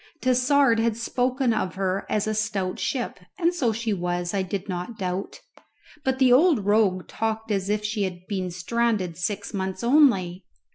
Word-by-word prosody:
Tassard 255 -1 +3
had 225 -1 +1
spoken 250 +1 0
of 185 -5 -2
her 190 0 -1
as 210 0 0
a 215 - -1
stout 210 -4 -2
ship, 245 -7 -2 0.2
and 345 -1 +2
so 260 -10 +1
she 220 0 -2
was, 175 -1 -2
I 200 - +1
did 190 +1 -4
not 185 +4 -5
doubt; 185 -1 -4 0.6
but 265 0 0
the 260 -2 +5
old 280 - +4
rogue 205 -3 +2
talked 220 0 -3
as 195 -1 -1
if 210 0 0
she 215 0 -2
had 180 -2 -3
been 185 -2 -3
stranded 185 0 -1
six 200 +5 -3
months 190 +1 -3
only! 235 - +3
210 Hz, 175 wpm, -25 LUFS, 185-235 Hz, 0.6 s, the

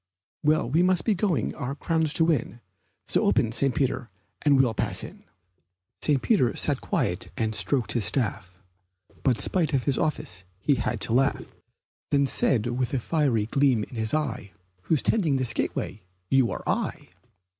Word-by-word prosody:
Well, 155 -3 +2
we 155 +8 +2
must 180 -1 +2
be 220 - +3
going 175 - 0
our 135 +3 -4
crowns 160 0 0
to 165 - +3
win, 120 - -1 0.5
So - - +1
open, 110 - +2
St. 130 +2 +1
Peter, 130 -3 -1 0.3
and 145 -2 +4
we'll 125 -4 +3
pass - - -2
in." - - -11 0.8
St. 145 -3 +3
Peter 180 - +2
sat - - -1
quiet - - -2
and 110 -1 0
stroked 125 +2 0
his 115 -5 0
staff; 95 -8 -2 0.6
But 125 -6 +1
spite 165 -5 +1
of 130 - 0
his 140 -3 0
office 90 - -2 0.2
he 140 - +2
had 115 -3 -2
to 115 - 0
laugh; 135 +3 +2 0.6
Then 140 -1 +3
said 130 -4 +2
with 125 +2 -1
a - - +1
fiery 130 -6 +1
gleam 130 -2 +2
in 120 - -9
his 110 -1 -1
eye, 115 - -3 0.3
"Who's 155 -4 +1
tending 170 -11 +2
this 130 -3 +2
gateway 105 - -3 0.3
you 135 -2 +4
or - - -6
I?" - - -2
135 Hz, 170 wpm, -26 LUFS, 115-150 Hz, 0.8 s, and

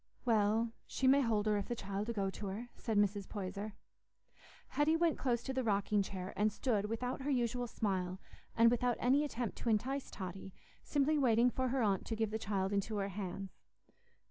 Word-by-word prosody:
"Well, 225 0 +3 0.2
she 265 - -2
may 275 +2 +6
hold 220 -4 +1
her 210 -1 +2
if 200 - -3
the 240 - -2
child 200 +1 -4
'ull 235 - -2
go 195 -2 0
to 205 - -6
her," 220 +6 -5
said 220 -3 -2
Mrs. 205 -1 +1
Poyser. 200 +1 -4 1.0
Hetty 300 +2 +2
went 330 -2 +2
close 240 -3 0
to 265 - -3
the 260 0 0
rocking 205 -1 +2
chair, 190 -1 -5
and 210 +1 +2
stood 210 -1 0
without 245 +4 -2
her 280 - -2
usual 245 -2 0
smile, 185 -4 -2 0.4
and 230 0 +7
without 245 0 +1
any 270 +4 +3
attempt 245 -6 -3
to 235 - -1
entice 260 +6 0
Totty, 190 0 -7 0.3
simply 295 +1 +2
waiting 245 -2 +4
for 260 +1 0
her 255 0 +1
aunt 195 -3 +1
to 225 - -2
give 220 -1 -1
the 220 - -2
child 195 -2 -1
into 200 +2 -1
her 200 0 -1
hands. 195 -1 -6
220 Hz, 195 wpm, -35 LUFS, 200-250 Hz, 1.0 s, and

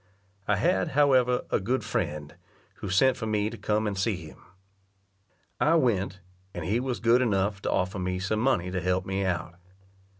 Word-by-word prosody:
I 105 - +3
had, 95 -2 +1
however, 130 -4 +4
a - - +2
good 125 +7 -1
friend, 75 -1 -3 0.4
who 100 - -6
sent 130 +7 +3
for 110 - -4
me 105 0 0
to - - -7
come 105 +1 0
and 105 -2 -1
see 100 +2 0
him. 80 -4 -11 1.2
I 160 +2 +4
went, 105 - +1 0.3
and 85 -2 -4
he 105 +7 +1
was 125 -1 -3
good 120 +2 +4
enough 100 -3 0
to - - -1
offer 95 +2 -1
me 90 0 -2
some 95 +4 -1
money 100 -8 +1
to 90 -1 -2
help 90 0 0
me 95 +1 -1
out. 90 -1 -3
100 Hz, 180 wpm, -27 LUFS, 90-120 Hz, 1.2 s, however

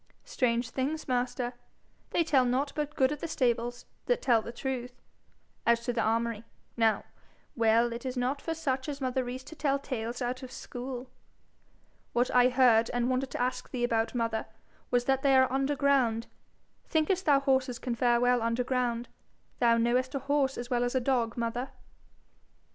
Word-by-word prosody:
'Strange 235 -1 0
things, 290 +4 -2
master? 250 -1 -1 0.6
They 340 - +2
tell 290 -5 +3
nought 255 +3 0
but 300 0 -3
good 260 +1 +3
of 295 - -4
the 335 - -4
stables 240 -4 -1 0.2
that - - +2
tell 235 -4 +3
the 230 - -7
truth. 250 0 -5 0.6
As 235 0 +3
to 245 - 0
the 230 - 0
armoury, 230 0 0 0.3
now 225 -2 +2 0.5
well 230 +1 +3
it 235 - -6
is 255 -1 -4
not 260 +3 -1
for 325 - -3
such 270 -3 -2
as 285 -1 -4
mother 260 -1 -1
Rees 250 +1 -6
to 305 +4 -11
tell 285 -3 +1
tales 245 -3 -4
out 250 +1 -2
of 255 -1 -8
school.' 250 0 -6 1.1
'What 245 +1 +1
I 250 0 +5
heard, 245 -3 +4
and 245 +1 +1
wanted 260 +1 0
to - - -4
ask 250 0 -3
thee 245 -2 -3
about, 230 0 0
mother, 230 -2 -1 0.4
was 245 0 +1
that 270 -1 +2
they 275 -1 +4
are 260 0 +4
under 275 +2 +1
ground. 255 -6 +2 0.6
Thinkest 340 +4 +1
thou 280 -2 +6
horses 265 -3 +1
can 245 +1 -3
fare 240 0 +2
well 245 0 +3
under 230 +2 0
ground? 245 -1 -1 0.5
Thou 235 -1 +4
knowest 250 +3 +1
a - - 0
horse 280 -2 +1
as 240 +1 -6
well 245 -1 +2
as 245 +1 -1
a - - +4
dog, 245 -2 0
mother.' 235 +2 -2
250 Hz, 180 wpm, -29 LUFS, 235-270 Hz, 1.1 s, thou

